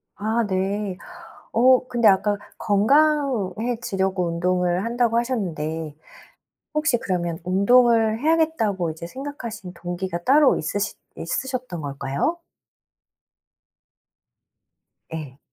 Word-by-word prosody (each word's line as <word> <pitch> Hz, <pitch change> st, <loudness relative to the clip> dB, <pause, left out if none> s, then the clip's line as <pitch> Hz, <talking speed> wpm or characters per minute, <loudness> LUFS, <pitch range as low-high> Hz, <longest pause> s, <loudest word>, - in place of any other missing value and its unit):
아 220 Hz, +3 st, 0 dB
네. 195 Hz, 0 st, -2 dB, 0.6 s
어 255 Hz, +2 st, +5 dB
근데 240 Hz, -3 st, +3 dB
아까 205 Hz, +1 st, +3 dB, 0.2 s
"건강해지려고 225 Hz, -, +1 dB
운동을 180 Hz, +2 st, 0 dB
한다."고 235 Hz, 0 st, +1 dB
하셨는데 165 Hz, -, -3 dB, 0.8 s
혹시 305 Hz, -5 st, +2 dB
그러면 175 Hz, -6 st, -2 dB
'운동을 225 Hz, +3 st, +4 dB
해야겠다.'고 300 Hz, -, +1 dB
이제 160 Hz, +1 st, -8 dB
생각하신 235 Hz, -5 st, -7 dB
동기가 175 Hz, 0 st, -4 dB
따로 280 Hz, +4 st, +5 dB
있으시 200 Hz, +6 st, -2 dB, 0.2 s
있으셨던 255 Hz, -, -4 dB
걸까요? 140 Hz, -, -2 dB, 2.7 s
예. 150 Hz, -5 st, -7 dB
205 Hz, 225 characters per minute, -23 LUFS, 175-245 Hz, 2.7 s, 어